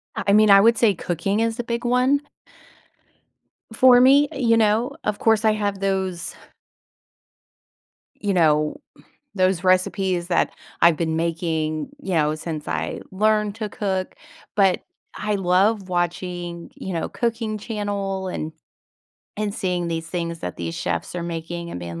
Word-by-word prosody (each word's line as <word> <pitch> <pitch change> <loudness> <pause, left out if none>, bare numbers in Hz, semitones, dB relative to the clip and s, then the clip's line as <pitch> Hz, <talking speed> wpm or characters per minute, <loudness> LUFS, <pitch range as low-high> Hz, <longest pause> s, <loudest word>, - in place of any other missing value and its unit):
I - - -3
I 200 - +4
mean, 215 0 +6
I 195 0 +8
would 230 +2 +4
say 220 -3 +4
cooking 175 +5 -2
is 225 0 0
the 240 - -2
big 235 0 -3
one 250 +3 +3 1.5
for 245 +2 +6
me, 275 +3 +6
you 230 -4 +2
know? 225 +4 +2
Of 210 -1 -2
course, 225 -1 +3
I 215 - +5
have 205 -2 -2
those 190 -2 -2 1.8
you 205 -2 -1
know, 150 -3 +3 0.6
those 185 -2 +1
recipes 185 -1 +1
that 175 - +2 0.3
I've 170 -2 +6
been 160 -1 -1
making, 160 -1 -1
you 190 - -2
know, 155 -2 +2
since 155 -1 -6
I 80 +1 -3
learned 210 +1 +1
to 220 -2 -3
cook. 190 -4 -3 0.4
But, 195 -3 +3 0.3
I 210 -1 -1
love 195 +2 +2
watching, 175 -1 -3
you 190 - -6
know, 165 -2 -2
cooking 230 -2 -2
channel 200 -3 -3
and 160 -3 -4 0.9
and 205 -1 -2
seeing 180 -3 -1
these 165 -1 -3
things 170 -1 -4
that 90 - -5
these 85 -1 -4
chefs 85 - -3
are 175 - -3
making, 170 0 -5
and - - -5
being 85 -1 -7
190 Hz, 150 wpm, -22 LUFS, 170-215 Hz, 1.8 s, I